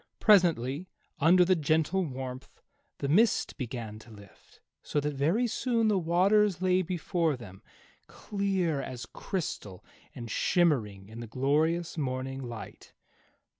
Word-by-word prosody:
Presently, 170 - +3 0.3
under 175 +4 +5
the 185 +1 +4
gentle 160 +4 +1
warmth, 130 -3 -7 0.3
the 140 - -3
mist 215 +11 +3
began 115 -5 -6
to 110 - -16
lift, 100 -2 -17 0.2
so 150 - -1
that 150 0 -2
very 165 - +1
soon 230 -1 +1
the 200 -3 +2
waters 185 +3 +3
lay 185 0 +2
before 170 -3 -1
them, 100 -5 -12 0.5
clear 190 -7 -1
as 125 -3 -6
crystal 105 - -5 0.3
and 120 -2 -7
shimmering 110 - +1
in 110 +2 -10
the 120 - -7
glorious 155 +8 0
morning 135 -1 -3
light. 120 -4 -9
155 Hz, 130 wpm, -29 LUFS, 125-185 Hz, 0.5 s, under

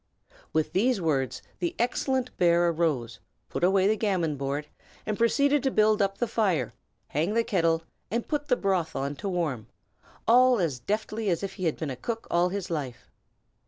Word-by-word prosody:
With 155 -1 0
these 235 +4 +2
words 135 -6 -1 0.2
the 175 -2 -2
excellent 255 +1 0
bear 175 -1 +4
arose, 150 -9 -1 0.3
put - - -4
away 190 +1 +4
the 210 - +4
backgammon 190 -8 0
board, 140 +2 -3 0.4
and 215 - -1
proceeded 280 +6 +3
to 270 - +1
build 215 -3 +3
up 195 0 0
the 240 - +1
fire, 185 - 0 0.4
hang 165 +9 0
the 230 - +3
kettle, 165 -6 +1 0.3
and 230 +4 -2
put 295 -1 -2
the 250 - +3
broth 190 -7 0
on 140 +2 -2
to 200 - -3
warm, 155 - -2 0.6
all 250 0 +6
as 155 -8 -1
deftly 215 - -2
as 170 +1 0
if 195 -1 -3
he 185 - -4
had 160 - 0
been 155 -4 -3
a - - -4
cook 225 - -4
all 175 +1 +3
his 195 -2 -4
life. 140 -7 -5
185 Hz, 185 wpm, -27 LUFS, 160-220 Hz, 0.6 s, all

